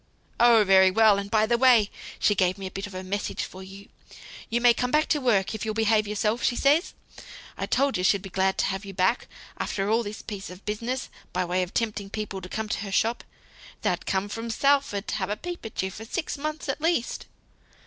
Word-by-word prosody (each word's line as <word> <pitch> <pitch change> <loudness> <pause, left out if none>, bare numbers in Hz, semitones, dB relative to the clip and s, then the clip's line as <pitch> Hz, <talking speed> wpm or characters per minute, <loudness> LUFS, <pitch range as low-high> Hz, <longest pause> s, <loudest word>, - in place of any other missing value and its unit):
"Oh, 235 -2 +6
very 190 -1 +6
well; 210 0 +5
and 200 0 -5
by 215 0 +3
the 235 +1 +1
way 240 -5 +5 0.3
she 210 - +3
gave 185 -2 +1
me 195 - -7
a 185 - -5
bit 195 +1 -5
of 195 - -11
a 185 - -5
message 200 +2 -3
for 185 - -9
you. 195 +1 -11 0.6
You 235 - +1
may 240 0 +6
come 250 +1 -1
back 305 +4 +3
to 295 - +2
work 215 -7 +2
if 220 - -5
you'll 215 -1 -2
behave 220 -1 +2
yourself, 210 +3 -1
she 240 - +2
says. 290 +7 +2 0.6
I - - -4
told 275 0 +1
you - - -1
she'd 190 0 +3
be 195 - -9
glad 190 +1 +1
to - - +2
have 195 +1 -2
you 195 -1 -9
back, 185 +7 +1 0.3
after 195 +1 -1
all 230 +1 +3
this 210 -1 -7
piece 205 -3 -7
of 180 +2 -12
business, 230 +5 -3 0.2
by 180 0 0
way 180 +1 0
of 180 +1 -5
tempting 210 -3 -1
people 210 -2 -5
to 180 - -9
come 220 +2 -3
to - - -1
her 200 -1 -5
shop. 230 +4 +1 0.6
They'd - - -1
come 195 +1 0
from 225 +3 -5
Salford 275 -4 +1
to - - -1
have 190 -2 -2
a 210 - -2
peep 350 0 -7
at 215 - -4
you, 190 - -3
for 215 - -9
six 315 +9 -3
months 305 +2 -4
at 275 +2 -3
least." 325 -7 -1
210 Hz, 235 wpm, -26 LUFS, 195-240 Hz, 0.6 s, Oh